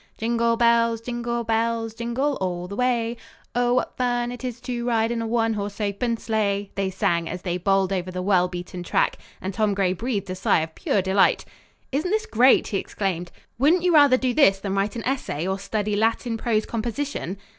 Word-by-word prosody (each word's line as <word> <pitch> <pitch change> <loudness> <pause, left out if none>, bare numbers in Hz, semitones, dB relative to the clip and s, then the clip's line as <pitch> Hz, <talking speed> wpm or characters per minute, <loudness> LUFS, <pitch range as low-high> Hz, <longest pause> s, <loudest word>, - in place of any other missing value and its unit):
Jingle 230 0 +1
bells, 230 -1 +3
jingle 235 0 -3
bells, 225 0 0
Jingle 240 +5 -1
all 180 -1 -2
the 200 - -6
way. 240 -1 0 0.4
Oh, 245 0 +2
what 255 - -1
fun 245 -1 0
'tis 250 -1 -6
to 245 -1 -4
ride 230 -1 +1
In 235 -1 -1
a 225 - -2
one 225 0 +1
horse 205 0 -4
open 220 +3 -1
sleigh. 205 -3 -1
they 195 -1 -1
sang 170 -3 0
as 180 +1 -6
they 180 -1 -1
bowled 195 +1 +2
over 185 -1 -2
the 180 0 -4
well 185 -2 +3
beaten 180 0 -7
track; 175 - +1 0.2
and 190 +1 -4
Tom 210 0 +1
Gray 190 -2 +1
breathed 205 -2 -3
a - - -3
sigh 185 -3 +2
of 160 0 -5
pure 195 - 0
delight. 190 +1 +3 0.5
"Isn't 300 +7 -1
this 435 +2 0
great!" 255 - +4
he 200 - 0
exclaimed. 180 -4 -3 0.3
"Wouldn't 325 +7 +4
you 360 -1 +3
rather 285 -4 +7
do 255 -1 0
this 240 -10 +5
than 195 -1 -3
write 195 +2 0
an 230 - -4
essay 250 - -2
or 190 +1 -1
study 210 +1 -2
Latin 225 +2 0
prose 225 -1 0
composition?" 235 -3 -3
225 Hz, 200 wpm, -24 LUFS, 195-240 Hz, 0.5 s, rather